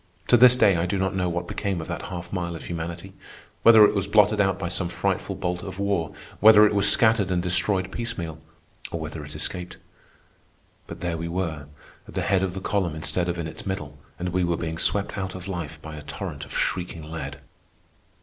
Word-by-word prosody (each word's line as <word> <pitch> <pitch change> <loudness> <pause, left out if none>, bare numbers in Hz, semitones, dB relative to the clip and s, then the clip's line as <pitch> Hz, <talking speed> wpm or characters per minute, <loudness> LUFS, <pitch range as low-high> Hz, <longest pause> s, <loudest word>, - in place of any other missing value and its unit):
To - - +7
this 125 +1 +8
day 100 -7 +4
I 85 +2 0
do 100 +2 -1
not 95 0 0
know 90 -2 0
what 85 0 -3
became 100 -4 -2
of 80 - -6
that - - -4
half 90 0 -7
mile 85 -2 -2
of 80 - -8
humanity—whether 90 +6 +2
it - - +2
was 100 -1 -1
blotted 105 0 +4
out 95 -1 +1
by 95 - -3
some 90 0 -2
frightful 95 +2 -2
bolt 90 -1 -3
of 95 -2 -7
war, 100 -5 -1 0.3
whether 105 0 +8
it 105 - +2
was 100 0 +4
scattered 110 -4 +3
and 90 -1 +1
destroyed 95 +1 +1
piecemeal, 90 -10 -5 0.5
or 85 - -3
whether 80 0 -6
it 75 - -9
escaped. 90 -1 -3 1.1
But - - -9
there 85 -1 -2
we 85 +1 -4
were, 85 -4 -3 0.4
at - - -12
the - - 0
head 95 -2 +2
of 95 -1 -2
the 95 - -5
column 95 -6 -1
instead 85 +3 -1
of 85 - -2
in 85 - -3
its 80 - -8
middle, 75 -6 -5 0.2
and 90 0 -3
we 90 +1 0
were 85 -1 0
being 80 -1 -4
swept 100 0 0
out 95 -1 -4
of 95 0 -8
life 85 -6 -5
by 80 -1 -7
a - - -7
torrent 75 - -6
of - - -6
shrieking 85 -3 -2
lead. 70 -3 -5
90 Hz, 215 wpm, -25 LUFS, 85-100 Hz, 1.1 s, this